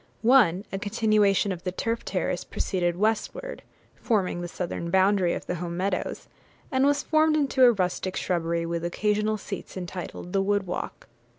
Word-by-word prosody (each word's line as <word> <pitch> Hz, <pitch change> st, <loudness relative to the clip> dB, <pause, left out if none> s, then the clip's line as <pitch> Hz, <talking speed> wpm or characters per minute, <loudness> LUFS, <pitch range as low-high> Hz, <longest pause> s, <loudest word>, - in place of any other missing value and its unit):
One, 215 Hz, -7 st, +5 dB
a 195 Hz, -, -3 dB
continuation 205 Hz, -2 st, +2 dB
of 180 Hz, -1 st, -5 dB
the 180 Hz, -, -2 dB
turf 230 Hz, +5 st, -2 dB
terrace, -, -, -2 dB
proceeded 175 Hz, -3 st, -1 dB
westward, 225 Hz, -, -1 dB, 0.3 s
forming 195 Hz, -6 st, 0 dB
the 175 Hz, -, -4 dB
southern 170 Hz, -1 st, -4 dB
boundary 190 Hz, -1 st, +3 dB
of -, -, -6 dB
the -, -, -2 dB
home 170 Hz, -1 st, -4 dB
meadows; 185 Hz, 0 st, -2 dB, 0.4 s
and 265 Hz, 0 st, +3 dB
was 285 Hz, 0 st, +2 dB
formed 310 Hz, 0 st, +3 dB
into 270 Hz, -3 st, +4 dB
a 245 Hz, -, +8 dB
rustic 185 Hz, -2 st, -2 dB
shrubbery, 170 Hz, -1 st, -1 dB
with 170 Hz, 0 st, -3 dB
occasional 210 Hz, +4 st, 0 dB
seats, 195 Hz, -1 st, -7 dB
entitled 180 Hz, 0 st, -6 dB
'The 195 Hz, -, +3 dB
Wood 200 Hz, 0 st, +1 dB
Walk.' 180 Hz, -, -5 dB
195 Hz, 165 wpm, -26 LUFS, 180-220 Hz, 0.4 s, a